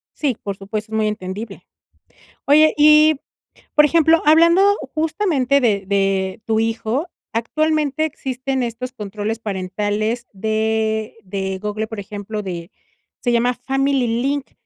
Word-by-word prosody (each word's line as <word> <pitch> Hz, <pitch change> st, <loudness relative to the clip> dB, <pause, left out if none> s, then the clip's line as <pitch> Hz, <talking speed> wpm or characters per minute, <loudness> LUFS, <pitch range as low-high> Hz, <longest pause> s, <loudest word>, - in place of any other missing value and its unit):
Sí, 270 Hz, -7 st, -1 dB
por 200 Hz, -1 st, -4 dB
supuesto, 210 Hz, +2 st, -5 dB
es -, -, -3 dB
muy 215 Hz, -1 st, +1 dB
entendible. 205 Hz, 0 st, -6 dB, 0.8 s
Oye, 310 Hz, +2 st, +5 dB
y, 305 Hz, +1 st, +6 dB, 0.6 s
por 300 Hz, -, +6 dB
ejemplo, 325 Hz, +1 st, +4 dB
hablando 335 Hz, +4 st, +6 dB, 0.3 s
justamente 310 Hz, -4 st, +1 dB
de 205 Hz, -6 st, +1 dB
de 195 Hz, +1 st, 0 dB
tu 220 Hz, -1 st, +1 dB
hijo, 225 Hz, +7 st, -1 dB, 0.2 s
actualmente 305 Hz, +5 st, 0 dB
existen 265 Hz, -3 st, -3 dB
estos 240 Hz, +2 st, -4 dB
controles 210 Hz, -1 st, -4 dB
parentales 210 Hz, +3 st, -2 dB
de 220 Hz, +1 st, -1 dB
de 190 Hz, 0 st, -3 dB
Google, 210 Hz, +2 st, -3 dB
por 220 Hz, -1 st, -6 dB
ejemplo, 205 Hz, +1 st, -6 dB
de 175 Hz, -2 st, -6 dB, 0.5 s
se 245 Hz, -, 0 dB
llama 240 Hz, +1 st, +2 dB
Family 270 Hz, +1 st, 0 dB, 0.2 s
Link, 280 Hz, +1 st, -2 dB
225 Hz, 125 wpm, -20 LUFS, 210-280 Hz, 0.8 s, y